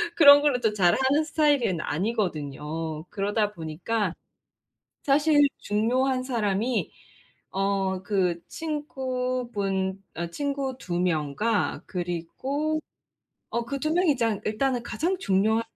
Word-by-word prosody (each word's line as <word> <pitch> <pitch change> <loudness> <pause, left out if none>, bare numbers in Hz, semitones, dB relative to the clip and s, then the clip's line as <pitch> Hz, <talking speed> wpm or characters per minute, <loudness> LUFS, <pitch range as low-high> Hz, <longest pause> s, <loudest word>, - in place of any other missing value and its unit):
그런 285 -2 +9
걸로 290 -4 +2
또 220 -3 +1
잘하는 260 - +3
스타일은 290 - +2
아니거든요. 160 - -2
그러다 205 +1 0
보니까 175 +4 -2 0.9
사실 290 +1 +4
중요한 255 +5 +1
사람이 230 -1 0 0.6
어 195 -1 0
그 180 -4 0
친구분 250 -10 -2
어 170 +1 -3
친구 275 +3 -2
2 175 -7 -3
명과 180 +5 0
그리고 210 - -2 0.7
어 235 0 -1
그 275 +4 -4
2 310 +3 -1
명이 340 -4 +3
장 225 -4 0
일단은 245 +3 0
가장 315 - -1
중요한 220 - +2
225 Hz, 215 characters per minute, -26 LUFS, 190-270 Hz, 0.9 s, 그런